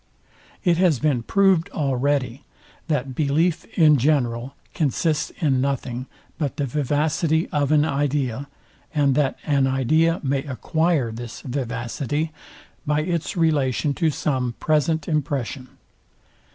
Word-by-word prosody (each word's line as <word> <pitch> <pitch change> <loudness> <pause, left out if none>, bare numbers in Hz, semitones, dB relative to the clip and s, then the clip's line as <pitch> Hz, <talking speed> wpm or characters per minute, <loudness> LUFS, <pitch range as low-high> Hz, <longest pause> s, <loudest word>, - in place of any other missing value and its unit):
It 175 -4 +3
has 175 -5 +3
been 140 -3 +1
proved 190 +4 +3
already, 135 -2 -1 0.4
that 135 -4 -1
belief 155 +5 +1
in 155 -4 +6
general 125 -2 0 0.2
consists 155 0 0
in 140 -7 +2
nothing, 130 -2 -2 0.3
but 145 -4 -2
the 145 - 0
vivacity 150 +4 0
of 145 -1 0
an 150 -1 +4
idea; 140 -3 -1 0.5
and 140 -2 +3
that 140 -1 +1
an 140 -3 +2
idea 155 +6 +2
may 135 0 0
acquire 150 - 0
this 115 +1 -8
vivacity 135 +4 -3 0.5
by 150 0 +1
its 170 +2 -2
relation 145 -4 +1
to 165 +2 +1
some 130 -5 -1
present 155 0 +1
impression. 140 -4 -2
145 Hz, 120 wpm, -23 LUFS, 130-155 Hz, 0.5 s, in